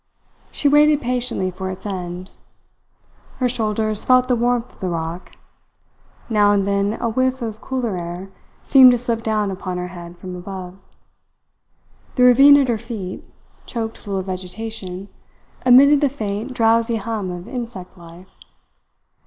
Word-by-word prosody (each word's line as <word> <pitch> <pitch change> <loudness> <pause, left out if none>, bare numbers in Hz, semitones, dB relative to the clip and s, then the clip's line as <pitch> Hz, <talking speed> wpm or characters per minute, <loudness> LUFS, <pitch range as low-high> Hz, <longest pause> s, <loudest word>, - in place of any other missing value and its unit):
She 290 - -1
waited 295 +1 +5
patiently 245 -6 -1
for 190 +1 -5
its 185 +2 -8
end. 180 -2 -5 1.0
Her 255 - 0
shoulders 215 -3 -1
felt 255 0 +4
the 250 - +2
warmth 240 0 0
of - - -24
the 185 - -2
rock; 165 +1 -5 0.9
now 210 -2 +3
and 200 -1 +1
then 200 +1 0
a 235 - -1
whiff 255 +2 0
of 220 -1 -6
cooler 250 -6 -3
air 175 +3 -7 0.3
seemed 265 -2 +8
to - - +2
slip 235 -1 -2
down 215 -3 -1
upon 185 -1 -5
her 180 0 -4
head 175 -1 -10
from 185 0 -8
above; 185 0 -8 1.4
the 250 - +3
ravine 275 +3 +8
at 275 -2 +2
her 235 -3 0
feet, 210 -6 -7 0.4
choked 225 -2 -4
full 200 -2 -5
of 190 - -3
vegetation, 190 +1 -6 0.6
emitted 280 +4 +7
the 285 - +3
faint, 215 -1 -4
drowsy 230 -1 +2
hum 215 -3 -3
of 175 0 -7
insect 230 -8 -7
life. 175 +1 -15
215 Hz, 150 wpm, -20 LUFS, 185-245 Hz, 1.4 s, seemed